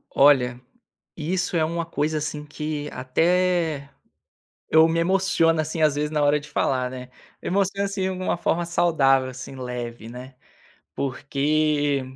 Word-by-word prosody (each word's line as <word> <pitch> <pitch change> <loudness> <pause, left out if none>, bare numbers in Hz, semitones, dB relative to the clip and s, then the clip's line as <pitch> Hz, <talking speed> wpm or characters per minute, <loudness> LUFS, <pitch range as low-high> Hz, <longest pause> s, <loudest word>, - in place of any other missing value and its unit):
Olha, 125 -4 +4 0.6
isso 180 +3 -1
é 160 - +2
uma 170 +1 -2
coisa, 155 -1 -1
assim, 150 0 -4
que 150 0 -4
até 165 +2 +1 0.8
eu 160 0 +6
me 165 0 0
emociono, 170 -2 +2
assim, 155 +1 -4
às 150 -2 +4
vezes, 150 +1 -1
na 150 -1 0
hora 145 +1 +3
de 150 +1 -13
falar, 130 -3 0
né. 125 0 -8 0.3
Emociono, 195 +1 0
assim, 195 -1 -3
em - - +1
alguma 185 -1 -2
forma 170 0 0
saudável, 145 -7 +2
assim, 130 +1 -9
leve, 120 -3 -6
né, 125 +2 -10 0.6
porque 145 +1 0
150 Hz, 145 wpm, -24 LUFS, 135-170 Hz, 0.8 s, eu